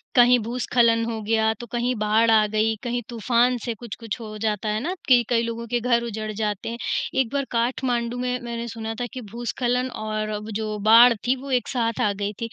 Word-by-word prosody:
कहीं 245 0 +7
भूस्खलन 235 0 +1
हो 225 -1 -4
गया 220 +1 +2
तो 240 - -8
कहीं 245 +1 0
बाढ़ 220 +2 +3
आ 215 -1 +5
गई, 215 +1 +1
कहीं 240 0 -2
तूफान 240 +2 +2
से 235 - -1
कुछ-कुछ 230 0 -7
हो 215 -1 -7
जाता 215 -1 -1
है 210 +1 0
ना 355 +4 -1
कि 245 -2 +6
कई 230 -1 +3
लोगों 230 0 -4
के 240 +1 0
घर 235 0 +1
उजड़ 215 -2 -4
जाते 210 0 -3
हैं। 235 - -5 0.4
एक 245 -4 +2
बार 280 -1 0
काठमांडू 240 0 -1
में 250 0 -1
मैंने 235 0 -4
सुना 225 -1 -5
था - - 0
कि 255 - -6
भूस्खलन 245 +1 -1 0.2
और 215 0 -2
अब 210 +1 -6
जो 215 -1 -3
बाढ़ 235 +2 +9
थी 260 - +3
वो 275 -1 -7
एक 250 -1 +1
साथ 230 -3 -1
आ 210 - +2
गई 205 +1 -3
थी, 230 - -3
230 Hz, 215 wpm, -24 LUFS, 220-245 Hz, 0.4 s, बाढ़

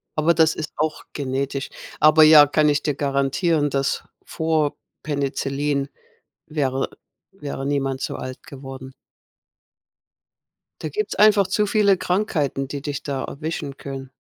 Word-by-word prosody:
Aber 160 +2 +3
das 160 -1 +4
ist 155 - -5
auch 155 0 -1
genetisch. 135 0 -3 0.3
Aber 155 +1 +7
ja, 155 -1 +9
kann 150 +1 +2
ich 145 0 +1
dir 150 - 0
garantieren, 145 +3 +1
dass, 135 0 -1 0.2
vor 160 -3 0 0.3
Penicillin 140 -1 -1 0.6
wäre, 135 -3 -1 0.4
äh, 195 - -27
wäre 140 -2 -4
niemand 135 -2 -1
so - - -3
alt 130 0 -7
geworden. 135 -2 -10 1.9
Da - - -3
gibt's 425 0 -3
einfach 205 -2 +5
zu 210 +2 +1
viele 200 -2 +4
Krankheiten, 165 -9 -1
die 140 0 -5
dich 145 -2 -4
da 135 -2 -3
erwischen 150 -2 -5
können. 135 -1 -7
145 Hz, 135 wpm, -22 LUFS, 135-160 Hz, 1.9 s, ja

